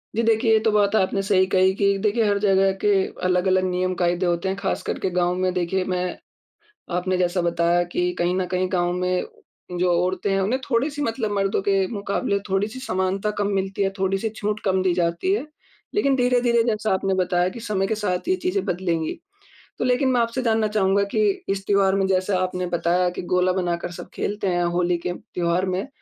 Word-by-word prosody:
जी, 230 - +2
देखिए 225 +1 +2
ये 220 - +5
तो 220 - +4
बात 205 0 +2
आपने 195 -1 +1
सही 190 -1 +3
कही 190 0 +3
कि 200 0 +2
देखिए 220 +2 +2
हर 205 0 +2
जगह 195 -1 +3
के 210 - +3 0.4
अलग-अलग 185 +1 +2
नियम-कायदे 180 -1 0
होते 175 +2 0
हैं, 190 - -1
ख़ास 200 -1 -2
कर - - -3
के 190 - -1
गाँव 180 0 +2
में 185 -1 +1
देखिए 180 +1 0
मैं 180 -1 -2 0.8
आपने 185 +1 0
जैसा 180 0 +1
बताया 170 0 +2
कि 180 0 0
कहीं 175 +1 +1
न 185 -1 0
कहीं 185 0 +1
गाँव 175 -1 +1
में 180 0 0 0.6
जो 180 0 +2
औरतें 185 +2 -1
हैं, 195 0 +1
उन्हें 235 +8 0
थोड़ी-सी 280 +5 0
मतलब 225 -4 -2
मर्दों 195 -1 0
के 195 -1 +2
मुकाबले 200 -1 -2
थोड़ी-सी 205 +6 -1
समानता 190 -3 -1
कम 200 - +1
मिलती 195 +1 -1
है, 195 - +1
थोड़ी-सी 195 +3 0
छूट 210 0 -2
कम 190 -2 +1
दी 185 -1 +2
जाती 170 - 0
है। 395 -7 -1 0.5
लेकिन 275 -10 +2
धीरे-धीरे 245 -2 +3
जैसा 215 -2 0
आपने 190 0 0
बताया 180 -1 +1
कि 210 +6 -8
समय 210 -4 -1
के 220 - -1
साथ 205 - -2
ये 370 - +3
चीज़ें 380 +2 0
बदलेंगी। 170 - -2 0.6
तो - - -1
लेकिन 250 +2 +2
मैं 245 -2 +2
आपसे 230 +2 -1
जानना 225 -2 +2
चाहूँगा 200 -2 +2
कि - - +2 0.3
इस 195 0 -2
त्योहार 195 -1 +3
में 195 -1 +1
जैसे 190 +1 +1
आपने 180 0 -1
बताया 175 +1 +1
कि - - -3
गोला 180 0 +3
बनाकर 175 -2 -2
सब - - -9
खेलते 205 -1 -2
हैं, 175 -1 +1
होली 175 0 +1
के 175 - -3 0.2
त्योहार 175 +1 0
में, 185 +8 -2
190 Hz, 205 wpm, -23 LUFS, 180-210 Hz, 0.8 s, ये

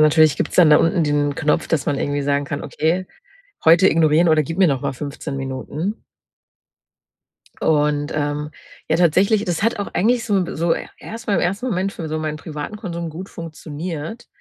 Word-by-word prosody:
natürlich 155 0 +5
gibt's - - -2
dann 170 -4 +7
da 150 - +8
unten 165 0 +2
den 145 -1 +1
Knopf, 150 -1 0
dass 155 -4 0
man 145 - +1
irgendwie 145 0 -1
sagen 140 0 0
kann: 140 +1 -4
„Okay, 175 +4 -1 0.6
heute 170 +4 +7
ignorieren“ 160 +1 +4
oder 155 -1 +4
„Gib 165 +5 -6
mir 190 - +6
noch 135 -2 0
mal - - -1
15 145 +1 -6
Minuten.“ 140 +9 -4 1.6
Und, 150 -1 +1
ähm, 150 0 -2 0.4
ja, 160 - +3
tatsächlich 190 +5 +3
das 175 +1 -1
hat 230 -1 +1
auch 200 - -2
eigentlich 235 +4 +2
so 200 -4 +2
so 165 +1 +2 0.2
erst 225 0 -9
mal 200 - +2
im - - +2
ersten 195 +9 -1
Moment 195 -2 -1
für 160 - -6
so 155 - -2
meinen 155 -1 -3
privaten 155 +5 -6
Konsum 170 -6 -5
gut 180 +5 -8
funktioniert, 165 +4 -7
160 Hz, 185 wpm, -20 LUFS, 150-185 Hz, 1.6 s, da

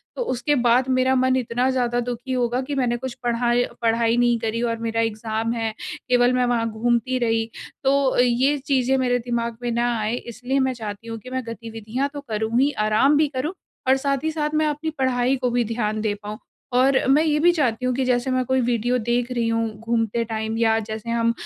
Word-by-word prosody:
तो - - -3
उसके 260 +4 0
बाद 245 +1 +3
मेरा 255 0 +3
मन 260 0 +3
इतना 250 0 0
ज़्यादा 245 -2 0
दुखी 245 +2 -4
होगा 245 -1 0
कि 290 - -2
मैंने 245 -3 +1
कुछ 260 0 -5
पढ़ाय 240 0 +2 0.2
पढ़ाई 230 0 +2
नहीं 240 -1 +3
करी 225 +1 -2
और 230 -1 0
मेरा 230 0 0
एग्ज़ाम 225 0 -2
है, 225 -2 -2 0.4
केवल 245 0 +4
मैं 250 0 +2
वहाँ 235 -2 0
घूमती 235 +3 0
रही। 225 -1 0 0.3
तो 270 - +3 0.2
अ, - - -1
ये 250 +4 +2
चीजें 265 -2 +1
मेरे 245 -1 +1
दिमाग 235 -1 -3
में 240 - -1
ना 240 +1 +1
आए 215 +2 -1
इसलिए 245 +3 -3
मैं 260 -1 +1
चाहती 220 -2 -7
हूँ 225 0 -5
कि 235 - -11
मैं 260 0 -3
गतिविधियाँ 230 +3 -4
तो 285 - -6
करूँ 220 +2 0
ही, 285 - +3
आराम 215 +6 +3
भी 305 0 +3
करूँ 290 +7 -2 0.3
और 265 - +6
साथ 275 0 -1
ही 315 - 0
साथ 300 -1 -1
मैं 310 - +2
अपनी 300 +2 -2
पढ़ाई 255 0 +2
को 250 -1 0
भी 240 0 +2
ध्यान 215 -1 -2
दे 215 -1 0
पाऊँ। 210 +1 -6 0.4
और 265 +2 +4
मैं 285 +4 +5
ये 300 -2 +2
भी 345 +3 +5
चाहती 255 -7 0
हूँ 255 - +1
कि 265 - 0
जैसे 250 +1 +1
मैं 255 0 +1
कोई 260 +1 +1
वीडियो 245 +1 +1
देख 240 +2 -1
रही 235 -2 0
हूँ, 230 0 +1
घूमते 230 0 0
टाइम 220 0 -3
या 225 -1 +3
जैसे 220 +1 -6
हम 230 0 +2
240 Hz, 220 wpm, -23 LUFS, 230-260 Hz, 0.4 s, और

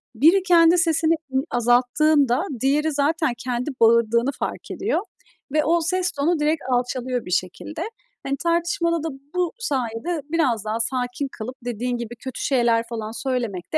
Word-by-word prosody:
biri 330 - +5
kendi 340 -2 +5
sesini 330 -1 +3
i 315 -5 -7 0.2
azalttığında 250 +4 +3 0.2
diğeri 295 +4 +2
zaten 295 -1 +1
kendi 245 +2 -3
bağırdığını 235 +2 +4
fark - - -4
ediyor 415 0 0 0.5
ve 305 0 +3
o 335 +3 +2
ses 365 +1 0
tonu 305 +4 0
direkt 300 +1 +1
alçalıyor 250 0 -1
bir 180 - -7
şekilde. 185 - -3 0.4
Hani, 275 0 -1
tartışmada 335 0 0
da 325 - -1 0.3
bu 360 -2 +1
sayede 280 - -2
biraz 250 -11 +1
daha 215 +1 -2
sakin 250 +3 -2
kalıp 245 +4 -6
dediğin 245 +1 -2
gibi 235 0 -6
kötü 260 +1 -7
şeyler 235 -4 +2
falan 225 -2 -4
söylemek 235 - -3
de - - +4
270 Hz, 155 wpm, -23 LUFS, 240-325 Hz, 0.5 s, biri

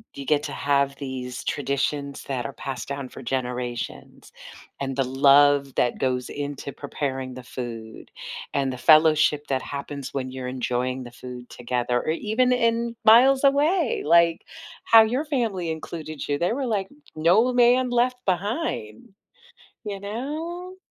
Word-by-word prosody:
you 140 - -7
get 150 +1 +2
to - - -5
have 140 -1 0
these 130 -2 -6
traditions 140 0 -2
that 125 -4 -3
are - - -4
passed 130 -3 -6
down 140 -2 -4
for 130 - -11
generations 125 -2 -5 0.5
and 135 0 -3
the 135 - +2
love 140 +1 +4
that 120 - +1
goes 125 -1 -1
into 145 -1 -5
preparing 135 -3 -4
the 130 - -9
food 115 -3 -8 0.4
and 135 -2 0
the - - -7
fellowship 155 0 +4
that 130 -1 0
happens 140 -1 -6
when 130 -2 -3
you're 130 -1 -6
enjoying 125 0 -2
the 120 - -10
food 125 0 -10
together 125 0 -1
or - - -4
even 220 +8 +1
in 235 -1 +1
miles 265 +5 +6
away. 295 +2 +2
Like, 170 +1 +4 0.4
how 225 -1 +8
your 250 +7 -1
family 225 - -1
included 155 -1 -6
you, 145 0 0
they 175 +3 0
were 265 +3 -2
like, 200 -4 -1 0.3
"No 180 +11 +3
man 245 +1 +4
left 250 +1 0
behind." 190 - -3 0.7
You 200 -2 -5
know? 315 - -5
145 Hz, 150 wpm, -24 LUFS, -, 0.7 s, how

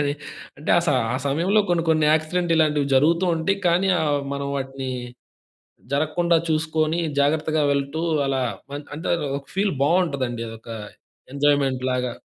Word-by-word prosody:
అని 145 0 0 0.5
అంటే 150 - -3
ఆ - - +6
స - - +1 0.3
ఆ - - +1
సమయంలో 175 +9 +2
కొన్ని 170 -1 +2
కొన్ని 155 -1 +3
యాక్సిడెంట్ 165 +2 0
ఇలాంటివి 150 -3 +2
జరుగుతూ 165 +7 +3
ఉంటాయి. 195 +5 0
కానీ 180 +3 +2
ఆహ్, 145 -2 +1
మనం 140 0 -3
వాటిని 135 -1 -4 1.0
జరగకుండా 165 +4 +2
చూసుకొని 155 +1 0 0.2
జాగ్రత్తగా 155 +1 +1
వెళ్తూ 140 +3 -2 0.3
అలా 135 -1 0 0.4
అం - - -5 0.2
అంటే 165 - -5 0.3
ఒక 140 - -15
ఫీల్ 195 -1 +1
బావుంటదండి. 140 -8 0
అదొక 115 +1 -11 0.7
ఎంజాయ్‌మెంట్‌లాగా. 130 -3 +1
150 Hz, 135 wpm, -23 LUFS, 140-165 Hz, 1.0 s, ఆ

